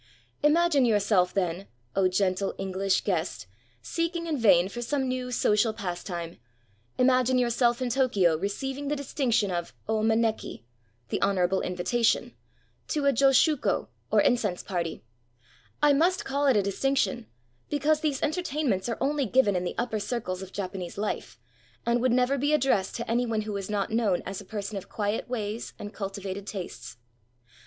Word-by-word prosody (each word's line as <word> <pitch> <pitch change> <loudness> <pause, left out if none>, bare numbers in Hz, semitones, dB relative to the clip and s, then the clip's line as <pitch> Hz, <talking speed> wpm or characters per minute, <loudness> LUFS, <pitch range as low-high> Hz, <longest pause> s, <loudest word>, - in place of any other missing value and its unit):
Imagine 305 -1 +4
yourself, 205 -5 +3
then, 185 0 -2
— 120 0 -40
oh, 190 -1 +4
gentle 185 +1 0
EngUsh 195 0 0
guest! 175 - -2 0.4
seeking 335 - -2
in 320 -2 -1
vain 195 -8 +5
for 240 +5 -6
some 265 +2 -1
new 255 0 -3
social 220 -1 +2
pastime 175 -4 -5 0.3
— 100 - -36 0.2
imagine 255 0 +3
yourself 240 0 +2
in 245 - -1
Tokyo 210 -10 +3
receiving 265 - -3
the 295 - 0
distinction 255 -7 0
of 175 -1 -4
0 220 0 0
maneki 220 - 0 0.2
— 115 +1 -40
the - - -2
honorable 190 -1 +2
invitation 215 +6 0 0.3
— - - -40
to 295 -3 -1
a 280 - +4
josshuko, 275 +3 +3 0.2
or - - +4
incense 210 -8 +1
party. 170 -7 -3 0.8
I 295 -1 +6
must 345 +6 +2
call 280 +1 0
it 260 -5 +5
a 205 - +3
distinction, 240 +3 0 0.4
because 300 +1 +2
these 300 -4 -1
entertainments 295 - -1
are 230 - -2
only 280 -1 0
given 210 -3 +3
in 180 - 0
the - - -3
upper 225 -2 -1
circles 205 -3 -3
of 190 -1 -8
Japanese 185 -3 -5
life, 210 +1 -3 0.5
and 235 0 +2
would 255 0 +2
never 255 +3 +2
be 290 +3 +1
addressed 255 -10 +2
to 235 - -4
any 245 +1 +1
one 220 -2 0
who 215 0 -5
was 200 -1 -4
not 205 -1 -1
known 220 -5 +1
as 195 0 -5
a - - -13
person 205 0 -5
of 190 - -8
quiet 210 +2 -2
ways 220 -2 -4
and 205 +1 -8
cultivated 195 0 -5
tastes. 125 - -7
220 Hz, 170 wpm, -27 LUFS, 190-265 Hz, 0.8 s, I